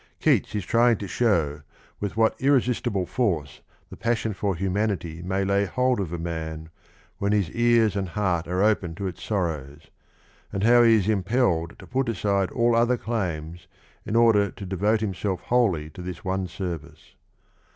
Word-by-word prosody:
Keats - - +2
is 100 -3 -2
trying 120 +1 +3
to 100 - -6
show 80 -11 +1 0.4
with 105 +1 -4
what 110 -1 +3
irresistible 125 -8 +1
force 85 - -2 0.3
the - - -8
passion 115 -1 -1
for 100 -1 -1
humanity 95 -3 -2
may 95 +2 -1
lay 100 +1 +2
hold 125 +5 +1
of 95 -5 -3
a 85 - -3
man 80 -1 -5 0.5
when 100 +1 +1
his 100 -6 +1
ears 115 -3 +3
and 95 -2 -2
heart 90 -3 -1
are 90 +3 0
open 100 -6 +1
to 100 - -5
its 90 -3 -5
sorrows, 80 -7 -3 0.6
and 95 - -2
how 120 +2 +6
he 115 -1 +6
is 105 -3 +1
impelled 95 -5 +1
to - - -12
put 130 0 -1
aside 100 -3 0
all 120 -1 +2
other 120 +2 +3
claims 85 -8 -4 0.4
in 105 - -4
order 110 -4 +4
to 100 - -9
devote 100 +4 +1
himself 95 -2 -2
wholly 100 -11 +1
to 90 - -10
this 90 +1 -7
one 95 0 -1
service. 90 -2 -7
100 Hz, 170 wpm, -25 LUFS, 85-115 Hz, 0.6 s, how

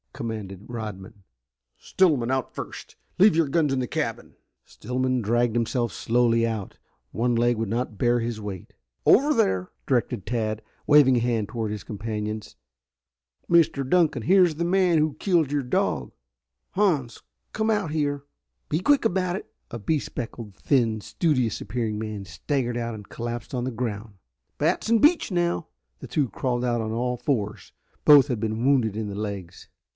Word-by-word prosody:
commanded 105 -4 -6
Rodman. 105 -3 -7 0.5
"Stillman 145 -10 +2
out 130 -1 -1
first. - - -8 0.2
Leave 200 -2 +6
your 165 -2 +3
guns 150 0 +1
in 135 - 0
the 125 - -2
cabin!" - - -4 0.3
Stillman 130 +1 -2
dragged 120 +2 +1
himself 120 -1 0
slowly 115 +3 +2
out. 110 -4 -4 0.3
One 120 +2 0
leg 120 0 +2
would 110 -2 -2
not 115 -1 -2
bear 120 +2 +2
his 115 -2 -3
weight. 100 -4 -7 0.3
"Over 290 +5 +5
there," 95 - +1 0.2
directed 120 -5 0
Tad, 110 -2 -2 0.2
waving 145 -4 +6
a - - +1
hand 115 -3 0
toward 110 -3 -3
his 105 -1 -5
companions. 105 0 -5 0.9
"Mr. 155 -5 +3
Dunkan, 155 -6 +2
here 190 - +5
is 170 -3 +1
the 170 +3 -1
man 180 -1 +3
who 155 -1 +2
killed 165 -5 +1
your 145 -1 0
dog. 125 - -1 0.6
Hans, 155 - 0 0.3
come 220 0 0
out 205 -7 0
here. 145 -2 -1 0.5
Be 155 - +1
quick 280 +6 +3
about 185 -3 +1
it!" 195 - -8 0.2
A 120 - -6
bespectacled, 115 -5 -4
thin, 115 -3 +1
studious 130 -5 0
appearing 115 -3 -2
man 110 -2 -5
staggered 120 - -2
out 115 -1 -3
and 105 -2 -10
collapsed 120 +2 -5
on 125 - -1
the 130 - -2
ground. 110 -3 -4 0.4
"Batts - - 0
and 230 -1 +4
Beach 305 - +4
now!" 175 -2 0 0.3
The - - -8
two 145 -4 0
crawled 125 0 -1
out 120 -1 0
on 110 0 -3
all 125 +2 -1
fours. 115 -7 -2 0.3
Both 145 -2 +8
had 125 -6 -2
been 110 +2 -2
wounded 125 -7 +3
in 110 -1 -3
the 100 - -5
legs. 100 -4 -6
120 Hz, 165 wpm, -25 LUFS, 110-150 Hz, 0.9 s, Both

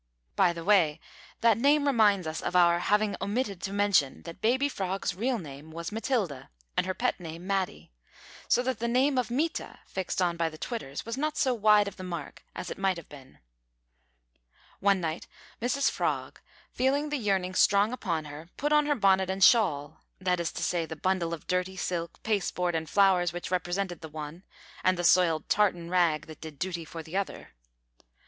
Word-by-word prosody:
By 180 -2 +4
the 170 -1 -7
way, 165 -6 +3 0.4
that 230 -2 +4
name 285 +3 +4
reminds 210 - +3
us 155 0 -4
of 180 - -3
our 170 -1 +5
having 210 +2 +1
omitted 200 -2 -2
to 195 - -4
mention 200 -9 +2
that 170 -1 -10
baby 260 +5 +2
Frog's 195 -8 -2
real 240 +7 -1
name 150 -4 -9
was 170 +3 -6
Matilda, 210 - -2 0.3
and 185 - +1
her 185 - -2
pet - - 0
name 165 0 -8
Matty, 185 - -2 0.6
so 245 - +3
that 260 0 -2
the 235 - -1
name 260 +3 +2
of 245 - -1
Mita, 305 +7 -2
fixed 190 -1 -3
on 175 -2 +1
by 165 -1 +1
the 155 - -11
Twitters, 155 - -5
was 230 +2 -4
not 305 +1 -1
so 260 - +2
wide 210 -2 +4
of 200 - -7
the 185 - -7
mark 170 -5 -6
as 180 0 -5
it - - -7
might 190 -2 +1
have 170 - -11
been. 135 -3 -14 1.4
One 200 -1 +3
night 160 0 -3 0.3
Mrs 255 +4 +1
Frog, - - -2 0.3
feeling 280 +4 +1
the 295 - -1
yearning 195 -5 0
strong 200 +4 +4
upon 165 -10 -2
her, 150 +3 -10
put 295 +1 0
on 300 -1 +4
her 295 - +2
bonnet 190 -4 +3
and 190 0 0
shawl 155 - +4 0.2
that 180 -1 0
is 170 - -1
to - - -4
say, 170 -2 0
the 160 - -6
bundle 175 +1 0
of 165 -2 -6
dirty 180 +1 -1
silk, 170 -2 -4
pasteboard, 180 -4 0
and 160 -1 -2
flowers 190 -4 +4
which 175 +1 -6
represented 180 0 -2
the 160 - -8
one, 155 +2 -7 0.4
and 185 -1 +3
the 175 - -2
soiled 170 -2 +4
tartan 175 -5 +1
rag 165 -5 +2
that 160 -1 -12
did 155 -3 -9
duty 170 -1 -3
for 165 +1 -8
the 160 +3 -9
other. 195 0 -3
185 Hz, 195 wpm, -28 LUFS, 170-215 Hz, 1.4 s, our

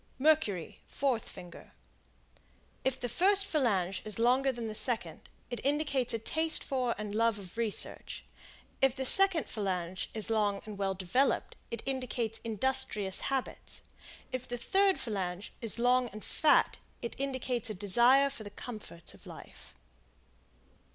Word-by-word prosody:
Mercury, 260 - +1
fourth 260 -6 -1
finger; 175 -1 -11 1.1
if 265 0 0
the 245 - -2
first 390 - +4
phalange 200 - 0
is 215 -2 -4
longer 255 +4 +3
than 235 -2 -5
the 215 - -4
second, 235 +1 -2 0.2
it 240 - -4
indicates 280 -3 +1
a 230 - +2
taste 315 +8 +1
for 255 -3 -1
and 210 -1 -5
love 230 0 +2
of 190 -2 -10
research; 225 -3 -2 0.6
if 270 -1 +4
the 265 - -3
second 385 +2 +6
phalange 185 -3 -3
is 220 0 -1
long 205 -2 +1
and 210 -2 -8
well 195 -1 0
developed, 190 +9 0
it 235 - -5
indicates 245 -4 -2
industrious 225 -4 +1
habits; 270 -2 -3 0.5
if 255 -1 -4
the 245 - -4
third 385 +10 +3
phalange 195 -3 -4
is 230 -2 -2
long 245 +1 +3
and 215 0 -10
fat, 310 -2 +3 0.2
it 235 - -3
indicates 260 -3 -1
a 215 - -4
desire 240 +8 +4
for 225 - -8
the 205 - -8
comforts 205 -6 -7
of - - -16
life. - - -12
235 Hz, 145 wpm, -31 LUFS, 210-265 Hz, 1.1 s, second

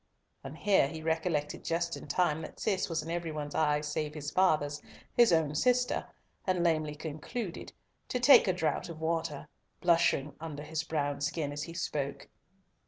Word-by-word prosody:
And 135 +3 -8
here 195 -8 +4
he 160 +2 -7
recollected 160 -2 -1
just 170 0 -1
in - - -9
time 160 -4 +1
that - - -9
Cis 200 -2 0
was 165 - -1
in 165 - -5
every 170 -1 -2
one's 150 -1 -5
eyes 150 -1 +1
save 150 0 -2
his 150 -1 -4
father's, 150 -5 +2 0.3
his 240 -5 +6
own 160 -3 +3
sister, 250 +9 +2 0.4
and 180 -2 +2
lamely 155 -3 +1
concluded 160 +7 -5 0.4
"to 250 - -1
take 250 -3 +7
a 185 - +3
draught 165 -1 -1
of 165 -2 -8
water," 160 -2 -2 0.3
blushing 165 -5 +3
under 155 -2 -6
his 160 +1 -2
brown 145 -3 -2
skin 145 0 -1
as 145 0 -4
he 165 +2 -6
spoke. 140 -4 -3
160 Hz, 170 wpm, -31 LUFS, 150-175 Hz, 0.4 s, take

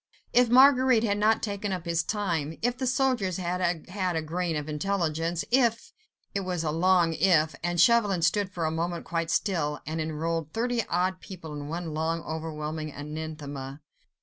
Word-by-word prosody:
If 245 -1 +5
Marguerite 255 -2 +6
had 205 -2 +1
not 220 +1 +3
taken 200 -1 -2
up 185 -2 -4
his 170 0 +1
time, 170 -7 -2
if 245 +1 +1
the 260 0 -2
soldiers 250 -8 +1
had 175 -2 -1
had 185 -2 -2
a 160 - 0
grain 170 +1 -2
of 150 0 -3
intelligence, 165 0 -1
if... 235 -3 +2 0.4
it 200 - 0
was 180 -3 -2
a 155 - 0
long 170 0 +3
"if," 160 -3 +3
and 175 +1 -1
Chauvelin 205 -3 +4
stood 185 +3 +1
for 170 -4 -2
a 155 - 0
moment 170 +1 -3
quite 165 -1 -2
still, 165 -7 0
and 160 +2 -3
enrolled 160 0 -3
thirty 235 0 0
odd 185 +2 0
people 165 -5 -9
in 145 -1 -6
one 165 -1 -4
long, 160 +1 -1
overwhelming 155 -1 -4
anathema. 145 -2 -6
170 Hz, 175 wpm, -27 LUFS, 160-200 Hz, 0.4 s, Marguerite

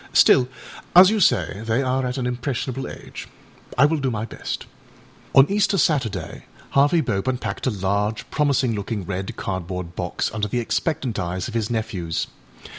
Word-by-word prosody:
Still, 125 0 +6 0.5
as 185 +3 +9
you 220 - +1
say, 120 - +2
they 115 +4 +1
are 130 +1 0
at 125 +2 -3
an 130 - -2
impressionable 125 +1 -3
age. - - -9 0.5
I 135 - +7
will 155 +1 +1
do 135 -2 0
my 110 -2 -2
best.â - - -5 0.7
On 135 - +9
Easter 200 0 +2
Saturday 115 - 0 0.3
Harvey 145 +5 +4
Bope 105 -4 -2
unpacked 130 +1 -2
a - - +4
large, 100 +1 -1
promising 140 -5 +2
looking 100 -1 -3
red 95 0 -4
cardboard 90 -2 -4
box 90 -1 -2
under 105 -1 -1
the 120 +4 -1
expectant 130 0 -1
eyes 90 +1 -3
of 120 - -7
his 115 -2 -1
nephews. 110 -8 -2
115 Hz, 165 wpm, -23 LUFS, 100-135 Hz, 0.7 s, as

